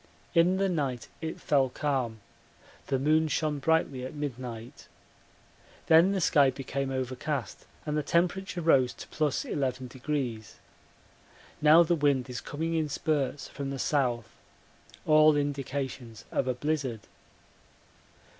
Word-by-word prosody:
In 175 +2 +4
the 195 0 +2
night 140 -9 -2
it 160 0 -4
fell 135 -3 +2
calm; 125 -5 -2 0.7
the 135 - +1
moon 155 +4 +3
shone 150 -1 -1
brightly 140 -3 +1
at 130 - -6
midnight. 125 -5 -6 1.0
Then 165 +4 +6
the 195 - 0
sky 145 -6 +4
became 135 +1 -3
overcast 130 -1 -4 0.2
and 150 -1 -2
the 150 - +1
temperature 180 +3 0
rose 135 -6 +4
to - - -10
+11. 130 -4 -2 1.2
Now 155 +3 +7
the 170 +1 +1
wind 140 -5 +1
is 125 - -5
coming 160 +3 -3
in 160 -2 0
spurts 145 -1 -1
from 140 -1 -5
the 135 - -4
south 125 -5 -1 0.7
all 155 0 +6
indications 135 -5 -3
of 130 - 0
a 130 - 0
blizzard. 135 -5 -2
140 Hz, 125 wpm, -29 LUFS, 130-155 Hz, 1.2 s, Now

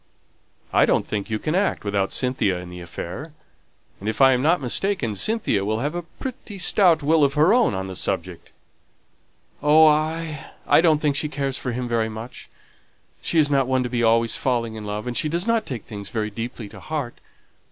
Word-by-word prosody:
"I - - +5
don't - - +2
think 105 0 -4
you 110 - -1
can 155 +8 -3
act 195 +3 0
without 100 -1 -1
Cynthia 125 -8 0
in 90 0 -8
the 90 0 -8
affair. 90 - -7 0.7
And 105 - -3
if 110 - -4
I 135 -1 +7
am 125 - +1
not 165 +5 +3
mistaken, 135 - -1
Cynthia 110 - 0
will 110 +2 -1
have 145 +3 -2
a 175 - -3
pretty 215 +3 -8
stout 180 -4 +3
will 155 +1 +3
of 140 0 +2
her 155 +7 +5
own 235 - +3
on 95 0 -3
the 95 -1 -7
subject." 90 -2 -3 1.1
"Oh, 155 +2 +6
I 155 0 +1
don't 160 -3 +4
think 150 -2 0
she 150 +1 -1
cares 140 -3 -2
for 125 - -3
him 125 +1 -3
very 115 -2 0
much; 110 +3 -9 0.7
she 170 - -1
is 145 -2 +4
not 135 -2 +2
one 130 -1 +1
to 125 - -3
be 120 -1 -1
always 115 0 +3
falling 120 -3 -1
in 110 -1 -7
love, 105 +1 -4
and 125 -1 -4
she 150 - 0
does 170 +4 -1
not 230 -1 +1
take 125 -5 -5
things 100 -2 -8
very 110 -2 -2
deeply 115 +1 -6
to - - -12
heart. 145 -6 -5
130 Hz, 205 wpm, -23 LUFS, 110-155 Hz, 1.1 s, I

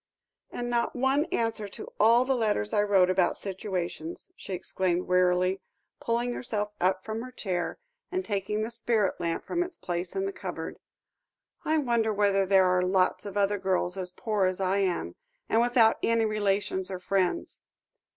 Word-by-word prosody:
"And 240 - -4
not 240 -1 0
one 265 +4 +2
answer 225 -8 -1
to 200 - -9
all 235 +3 +5
the 265 0 +1
letters 210 - 0
I 205 - +4
wrote 195 -3 +4
about 185 -1 +2
situations," 180 -4 -5
she - - -10
exclaimed 180 -1 -1
wearily, 180 +1 +2 0.4
pulling 240 +1 -1
herself 210 -4 -3
up 185 +1 +2
from 220 +1 -3
her 255 +1 -8
chair, 185 -7 -3 0.3
and 370 +1 -2
taking 210 +1 -1
the 225 - -4
spirit 230 -4 0
lamp 170 -1 -2
from 345 - -1
its 355 -1 -4
place 175 0 -4
in 385 0 0
the 390 - -3
cupboard. - - -6 0.8
"I 315 +1 +2
wonder 235 -6 +1
whether 200 -2 +2
there 190 -1 +5
are 180 0 +3
lots 185 +2 +1
of 200 0 -5
other 205 0 +2
girls 185 -1 0
as 185 -2 -2
poor 205 0 0
as 185 0 -2
I 190 +1 +1
am, 190 -3 -1 0.3
and 225 - +3
without 240 -2 +4
any 230 -1 +2
relations 200 -3 0
or 190 - -4
friends. 190 - -1
200 Hz, 170 wpm, -28 LUFS, 185-230 Hz, 0.8 s, all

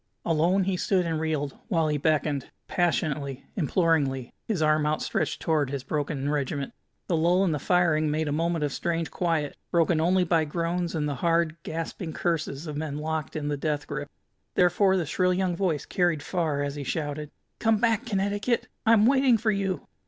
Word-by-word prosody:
Alone 170 +4 +3
he 190 0 0
stood 185 0 +1
and 165 -2 -1
reeled, 155 -3 -2
while 165 -3 +1
he 150 -1 0
beckoned, 150 -2 0 0.2
passionately, 150 -6 -1
imploringly, 150 - +1
his 215 -6 0
arm 155 -1 +3
outstretched 155 0 -1
toward 155 -4 +1
his 140 -2 -4
broken 145 0 -2
regiment. 140 -1 -2 0.3
The 175 - 0
lull 175 +4 +3
in 185 - +2
the 150 - -1
firing 160 -3 +2
made 155 +1 0
a - - -1
moment 165 +1 0
of 140 - -3
strange 165 -1 -2
quiet, 165 -5 -1
broken 165 -2 +2
only 180 +3 +3
by 165 -2 +2
groans 170 +2 -2
and 150 -2 0
the 145 - -1
hard, 165 -2 +2
gasping 165 +1 -5
curses 155 -3 -2
of 150 -2 -5
men 150 -2 -3
locked 155 +1 -3
in 150 -2 -2
the 145 -1 -1
death 145 0 -2
grip. 145 0 -5 0.5
Therefore 190 +2 +4
the 175 - 0
shrill 180 +4 +1
young 185 -1 0
voice 170 -5 -1
carried 175 -6 +1
far, 155 -6 -1
as 140 0 -2
he 145 -1 -5
shouted: 150 +1 -3 0.3
"Come 225 -1 +3
back, 230 +2 +1
Connecticut! 205 +4 0 0.2
I'm 220 -2 +6
waiting 265 -1 +5
for 220 0 +1
you!" 195 -2 -2
160 Hz, 180 wpm, -27 LUFS, 150-180 Hz, 0.5 s, I'm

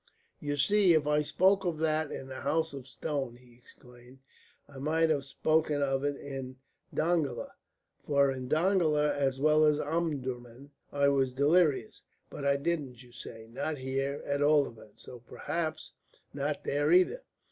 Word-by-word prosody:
"You 145 0 -3
see 185 +4 +4
if 155 -2 +2
I 150 0 +2
spoke 190 +6 +2
of 175 -4 -1
that 155 -1 0
in - - -6
the 130 -1 -7
House 160 -1 0
of 135 -2 -8
Stone," 135 -3 -4
he 125 0 -19
exclaimed, 125 +1 -18 0.5
"I 140 -2 -12
might 160 +3 +2
have 140 -3 0
spoken 155 +1 +1
of 135 0 0
it 145 0 0
in 135 -2 -7 0.3
Dongola. 155 -6 -1 0.6
For 140 -1 +3
in 130 -1 -5
Dongola 155 -4 +2
as 135 -2 -1
well 155 +2 +4
as 150 -1 +4
in - - -2
Omdurman 140 -5 -4 0.2
I 140 0 +2
was 135 -2 +1
delirious. 155 +7 +2 0.3
But 140 - -6
I 140 0 +3
didn't, 140 -5 -3
you 120 - -18
say 115 -1 -10
not 145 +6 -4
here, 135 +2 -3
at 140 0 -1
all 145 -1 +4
events. 110 -2 -15
So 125 - -10
perhaps 160 +6 -4 0.4
not 145 +1 -3
there 145 +2 0
either. 185 - +4
145 Hz, 165 wpm, -30 LUFS, 135-155 Hz, 0.6 s, see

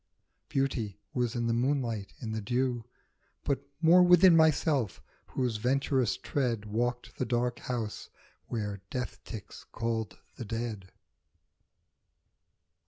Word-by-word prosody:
Beauty 115 -7 -1
was 125 -1 0
in 120 -1 0
the 115 - +2
moonlight, 120 -4 0
in 110 -3 -4
the 110 0 -2
dew, 120 +1 0 0.6
But 140 -2 0 0.2
more 170 +3 +8
within 180 0 +7
myself, 155 - +3 0.3
whose 125 -4 -1
venturous 130 +1 +1
tread 120 -6 -1
Walked 120 +2 -2
the - - +2
dark 120 0 0
house 120 -5 -4 0.4
where 105 -4 -3
death 125 -1 -4
ticks 110 -5 -9
called 115 -1 -3 0.2
the 120 - -5
dead. 110 -3 -4
120 Hz, 115 wpm, -30 LUFS, 110-135 Hz, 0.6 s, more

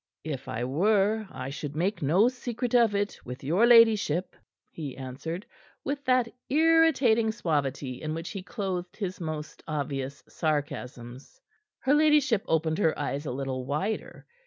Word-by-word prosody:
"If 140 -4 -5
I 115 +2 -3
were, 200 - +2
I 130 +1 -6
should 145 0 -6
make 190 +6 -1
no 175 - +4
secret 245 -1 -3
of 230 -4 +4
it 200 0 -1
with 125 +2 -8
your 180 - +3
ladyship," 220 -7 +5 0.4
he 145 -5 -6
answered 140 - -6 0.4
with 280 0 -3
that 255 -2 +3 0.2
irritating 290 -8 +4
suavity 140 - -2
in 155 0 -3
which 165 +1 -5
he 195 - -5
clothed 185 -3 -4
his 185 -4 -4
most 155 -2 -5
obvious 140 -2 -3
sarcasms. 130 -5 -4 0.4
Her 265 - +3
ladyship 295 -8 +4
opened 160 +1 +1
her 160 -6 +2
eyes 145 +2 -3
a - - -2
little 130 0 -3
wider. 190 +11 -3
170 Hz, 145 wpm, -28 LUFS, 140-225 Hz, 0.4 s, ladyship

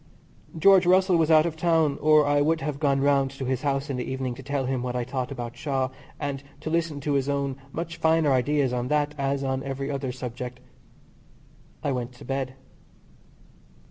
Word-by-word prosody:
George 190 +2 +6
Russell 185 0 +5
was 165 -2 +3
out 155 0 +6
of 165 -2 -2
town 160 -3 +2
or 155 0 +5
I 145 0 +3
would 160 +2 +2
have 140 0 -3
gone 140 -3 +2
round 140 -1 +3
to 135 0 -6
his 130 0 -1
house 140 -1 -1
in 135 -3 -3
the 125 - -2
evening 130 -1 -2
to - - -10
tell 140 -1 -2
him 130 -1 -1
what 125 0 -3
I 125 - 0
thought 130 +1 -3
about 120 -3 -5
Shaw, 135 -1 -1 0.3
and 140 -2 -3 0.2
to 155 - -4
listen 165 -3 0
to 145 +1 -1
his 140 0 +1
own 140 -1 -1 0.2
much 165 +2 -5
finer 160 -2 +3
ideas 135 +1 +2
on 125 0 -1
that 150 +1 +1
as 140 0 0
on 130 0 -1
every 135 +1 -4
other 135 -2 -3
subject. 125 0 -6 1.2
I 145 - 0
went 125 -1 -3
to 120 - -13
bed. 135 0 -3
140 Hz, 200 wpm, -26 LUFS, 130-155 Hz, 1.2 s, George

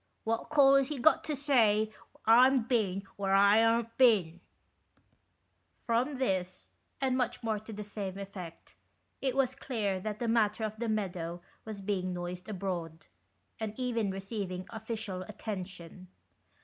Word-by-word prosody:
What 225 +1 -2
call 280 -3 +6
Is 275 -1 +2
he 300 0 -4
got 290 +6 +4
to 305 - -1
say 220 -7 +3 0.3
I'm 250 +3 +6
bin 210 -6 0
where 195 -1 +1
I 200 +3 +6
aren't 230 0 +1
bin? 195 -10 +4 0.7
" - - -43
From 245 +5 +1
this, 185 -8 -2 0.3
and 265 -1 +1
much 250 -2 -1
more 220 -2 0
to 215 +2 -11
the 210 0 -6
same 200 -2 -5
effect, 190 -4 -9 0.5
it 265 -2 0
was 265 -2 +2
clear 215 -8 -2
that 210 +2 -4
the 235 - -2
matter 225 -1 +2
of 215 0 -4
the 235 -1 -1
meadow 175 -5 -3 0.2
was 215 -2 -7
being 185 -2 -1
noised 180 +2 -6
abroad, 175 -5 -4 0.5
and 220 +1 -5
even 230 -5 0
receiving 195 -1 -4
official 220 -4 -5
attention. 185 -3 -7
215 Hz, 150 wpm, -31 LUFS, 190-235 Hz, 0.7 s, call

